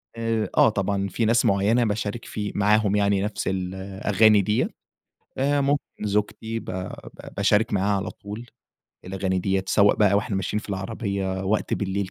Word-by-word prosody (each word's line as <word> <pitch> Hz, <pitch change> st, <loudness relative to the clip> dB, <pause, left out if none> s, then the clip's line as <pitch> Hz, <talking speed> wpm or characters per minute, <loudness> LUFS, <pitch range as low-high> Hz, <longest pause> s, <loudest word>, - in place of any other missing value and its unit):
آآ، 115 Hz, -1 st, -1 dB
آه، -, -, +7 dB
طبعًا 100 Hz, -1 st, -1 dB
في 115 Hz, -, -1 dB
ناس 115 Hz, +2 st, +3 dB
معينة 105 Hz, +5 st, +3 dB
باشارك 105 Hz, +1 st, -3 dB
في 105 Hz, -1 st, -4 dB
معاهم 105 Hz, 0 st, +3 dB
يعني 100 Hz, -1 st, +2 dB
نفس 105 Hz, +1 st, -3 dB
الأغاني 95 Hz, +3 st, +2 dB
ديّة 105 Hz, +3 st, 0 dB, 0.7 s
آآ، 140 Hz, +2 st, +2 dB
ممكن 140 Hz, +1 st, +1 dB, 0.2 s
زوجتي 105 Hz, +2 st, -1 dB
ب -, -, -13 dB
ب 95 Hz, 0 st, -4 dB, 0.5 s
باشارك 105 Hz, +1 st, +2 dB
معاها 100 Hz, +1 st, +2 dB
على 100 Hz, +2 st, -3 dB
طول 105 Hz, +4 st, -9 dB, 0.6 s
الأغاني 95 Hz, 0 st, -2 dB
ديّة، 95 Hz, +1 st, 0 dB
سواء 100 Hz, 0 st, +4 dB
بقى 100 Hz, -2 st, +4 dB
وإحنا 100 Hz, -1 st, 0 dB
ماشيين 95 Hz, +2 st, -1 dB
في -, -, -13 dB
العربية 95 Hz, -1 st, -3 dB
وقت 105 Hz, +3 st, 0 dB
بالليل 100 Hz, -1 st, -2 dB
100 Hz, 160 wpm, -24 LUFS, 95-110 Hz, 0.7 s, آه